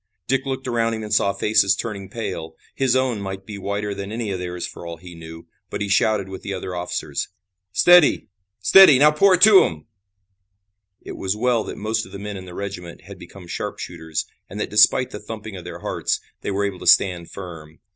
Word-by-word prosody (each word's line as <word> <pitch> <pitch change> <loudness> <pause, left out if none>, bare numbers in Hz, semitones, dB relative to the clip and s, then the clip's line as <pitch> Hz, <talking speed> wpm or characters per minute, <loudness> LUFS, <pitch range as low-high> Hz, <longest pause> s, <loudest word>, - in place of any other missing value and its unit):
Dick 135 +1 -1
looked 130 -1 -4
around 115 -2 0
him 110 - -6
and 105 0 -4
saw 100 -2 +3
faces 100 -1 +2
turning 100 -4 -6
pale. 80 -7 -6 0.2
His 130 -2 +1
own 130 -5 0
might 95 0 -6
be 105 -1 -8
whiter 100 +1 -3
than 100 +1 -6
any 110 -2 -3
of 95 - -3
theirs 90 -1 -4
for - - -10
all 85 -1 -7
he 85 +1 -12
knew, 80 0 -11 0.2
but - - -5
he 100 - -3
shouted 100 0 +2
with 95 0 -8
the 100 - -5
other 95 0 -6
officers: 90 0 -3 0.4
"Steady! 175 - +5 0.3
Steady! 150 - +8
Now 150 +3 +6
pour 185 +5 +4
it 180 - +7
into 210 -3 +8
'em!" 80 -2 -4 1.2
It - - -8
was 95 +1 -2
well 120 0 +1
that - - -7
most 110 +1 -2
of - - -16
the - - -6
men 100 +1 -6
in 95 -1 -8
the 90 -1 -11
regiment 90 -4 -7
had - - -12
become 95 -3 -12
sharpshooters, 80 -2 -5 0.2
and 100 - -7
that - - -3
despite 110 +4 +4
the 105 - -7
thumping 110 -1 -8
of 90 - -9
their - - -8
hearts, - - -2 0.2
they - - -4
were 100 +1 0
able 95 -2 -4
to - - -7
stand 90 -3 +4
firm. 80 -5 -10
100 Hz, 215 wpm, -22 LUFS, 90-115 Hz, 1.2 s, Steady